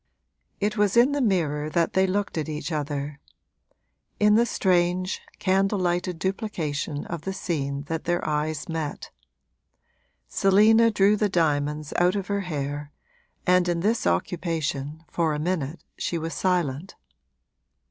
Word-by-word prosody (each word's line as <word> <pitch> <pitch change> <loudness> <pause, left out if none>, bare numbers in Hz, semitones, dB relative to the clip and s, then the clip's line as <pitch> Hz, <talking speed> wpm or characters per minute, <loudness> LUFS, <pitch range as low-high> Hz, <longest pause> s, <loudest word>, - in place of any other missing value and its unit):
It 210 +2 -1
was 205 +1 +2
in 245 +4 +6
the 285 0 0
mirror 155 - +1
that 170 +1 +1
they 190 0 +3
looked 200 +2 -1
at 160 -1 -2
each 155 +2 -4
other 145 -1 -3 1.0
in 210 0 +5
the 235 +2 +4
strange, 180 -2 +1 0.2
candle 195 +2 +2
lighted 175 -1 0
duplication 165 -7 -3
of 170 -7 -5
the 190 +4 -4
scene 140 -7 -2
that 160 +2 -4
their 175 0 0
eyes 150 0 -1
met. 160 -3 -4 1.2
Selina 215 +4 +5
drew 205 -1 +4
the 210 0 +1
diamonds 150 -3 0
out 180 +2 +3
of 200 -2 -2
her 200 0 0
hair, 145 -4 -4 0.5
and 180 -1 +4
in 170 -1 0
this 225 +5 +1
occupation, 160 -3 -2
for 160 -3 0
a - - -3
minute, 160 -2 -2 0.2
she 170 - -1
was 165 0 -4
silent. 175 -2 -1
175 Hz, 140 wpm, -25 LUFS, 150-195 Hz, 1.2 s, in